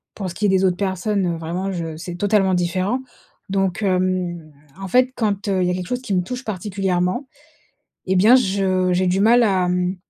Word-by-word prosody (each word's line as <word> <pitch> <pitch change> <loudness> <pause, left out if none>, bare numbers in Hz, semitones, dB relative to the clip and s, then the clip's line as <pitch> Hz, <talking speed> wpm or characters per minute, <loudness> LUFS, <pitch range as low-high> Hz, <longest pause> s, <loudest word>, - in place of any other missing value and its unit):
Pour 195 -3 -4
ce - - -7
qui 210 - -1
est - - +3
des 190 0 +2
autres 180 -1 +1
personnes 190 -2 -1
vraiment 175 +4 -3
je, 170 - -3
heu, 160 -1 -6
c'est 175 +2 -7
totalement 195 0 +2
différent. 185 +8 0 0.5
Donc 195 0 -1
hem, 180 -4 -1 0.3
en 195 - -5
fait 255 +4 +3
quand, 205 -2 -1
heu, 190 -2 +1
il - - +1
y - - +1
a - - 0
quelque 180 -1 -4
chose 250 0 -3
qui 230 -6 -4
me 180 - +2
touche 250 +7 -6
particulièrement 190 +2 -2 0.8
et 190 0 +1
bien 210 +7 +6
je 190 -5 +1
j'ai 185 +1 +1
du 180 +2 +1
mal 235 +4 +5
à, 185 -3 +1
mmh, 180 +1 0
185 Hz, 215 wpm, -21 LUFS, 180-205 Hz, 0.8 s, bien